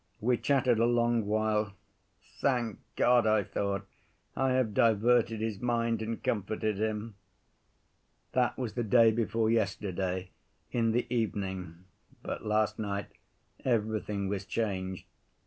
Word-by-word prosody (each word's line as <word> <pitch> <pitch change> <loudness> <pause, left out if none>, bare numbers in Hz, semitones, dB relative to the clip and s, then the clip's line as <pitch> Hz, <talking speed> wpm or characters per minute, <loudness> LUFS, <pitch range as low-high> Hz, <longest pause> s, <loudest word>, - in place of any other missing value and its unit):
We 120 +3 +2
chattered 130 -3 +2
a 115 - +4
long 120 -2 +2
while. 105 -1 +1 0.7
Thank 120 -5 0 0.2
God, 120 -2 +4
I 110 -1 +3
thought, 100 0 -2 0.5
I 135 -1 +2
have 130 -5 +1
diverted 115 +1 +3
his 110 -3 -2
mind 115 -2 0
and 110 +1 -4
comforted 105 0 -1
him. 110 0 -2 1.2
"That 125 -1 +1
was 125 -4 -3
the 120 - -1
day 115 +1 +5
before 115 0 +1
yesterday, 95 -4 -1 0.4
in 115 -2 +2
the 120 - +1
evening, 95 -6 -3 0.4
but - - -5
last 105 0 +1
night 100 -2 -3 0.5
everything 105 -4 0
was 100 0 -2
changed. 95 -3 -3
110 Hz, 125 wpm, -30 LUFS, 100-120 Hz, 1.2 s, day